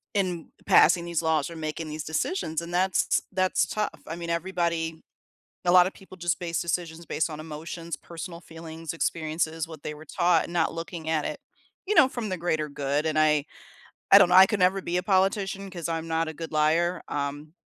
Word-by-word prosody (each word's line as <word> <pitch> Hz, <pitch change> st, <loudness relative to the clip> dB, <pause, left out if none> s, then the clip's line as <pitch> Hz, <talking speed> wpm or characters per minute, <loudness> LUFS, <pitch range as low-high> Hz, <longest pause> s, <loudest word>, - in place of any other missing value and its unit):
In 180 Hz, -4 st, -1 dB, 0.2 s
passing 170 Hz, +1 st, +5 dB
these 170 Hz, -2 st, -1 dB
laws 160 Hz, -1 st, +1 dB
or -, -, -8 dB
making 155 Hz, 0 st, -4 dB
these 155 Hz, 0 st, -5 dB
decisions, 160 Hz, +1 st, -2 dB
and 170 Hz, +1 st, -8 dB
that's 185 Hz, +1 st, +2 dB
that's 185 Hz, 0 st, +1 dB
tough, 215 Hz, -1 st, -1 dB, 0.2 s
I 165 Hz, -, -4 dB
mean, 170 Hz, 0 st, -4 dB
everybody 170 Hz, -2 st, -1 dB, 0.6 s
a 175 Hz, -, +4 dB
lotta 180 Hz, +1 st, +6 dB
people 190 Hz, -1 st, -14 dB
just 175 Hz, -2 st, -1 dB
base 170 Hz, -2 st, -2 dB
decisions 170 Hz, -1 st, -3 dB
based 160 Hz, -, -1 dB
on 155 Hz, -1 st, -6 dB
emotions, 165 Hz, +2 st, -6 dB
personal 170 Hz, 0 st, -8 dB
feelings, 165 Hz, -1 st, -8 dB
experiences, 160 Hz, 0 st, -1 dB
what 160 Hz, -3 st, -11 dB
they 150 Hz, -, -4 dB
were 150 Hz, +1 st, -12 dB
taught, 175 Hz, +1 st, +2 dB
and 170 Hz, -, -9 dB
not 165 Hz, -2 st, +1 dB
looking 165 Hz, -1 st, -6 dB
at 155 Hz, -2 st, +1 dB
it, -, -, -4 dB, 0.4 s
you 420 Hz, +2 st, 0 dB
know, 305 Hz, -5 st, +8 dB
from 240 Hz, -5 st, -4 dB
the 185 Hz, -, -2 dB
greater 160 Hz, -3 st, -1 dB
good, 145 Hz, +1 st, -1 dB
and 155 Hz, -1 st, +1 dB
I 150 Hz, -1 st, +4 dB, 0.7 s
I 195 Hz, -, +10 dB
don't 195 Hz, -3 st, +7 dB
know, -, -, +3 dB
I 190 Hz, +1 st, +10 dB
could 210 Hz, 0 st, -2 dB
never 185 Hz, +2 st, +3 dB
be 175 Hz, -1 st, -2 dB
a 180 Hz, -, +1 dB
politician 195 Hz, 0 st, +1 dB
'cause 175 Hz, -3 st, -5 dB
I'm 165 Hz, 0 st, -3 dB
not 165 Hz, 0 st, 0 dB
a -, -, -4 dB
good 165 Hz, +1 st, -7 dB
liar, 165 Hz, +4 st, +2 dB
um, 145 Hz, +1 st, -4 dB
170 Hz, 205 wpm, -26 LUFS, 160-180 Hz, 0.7 s, I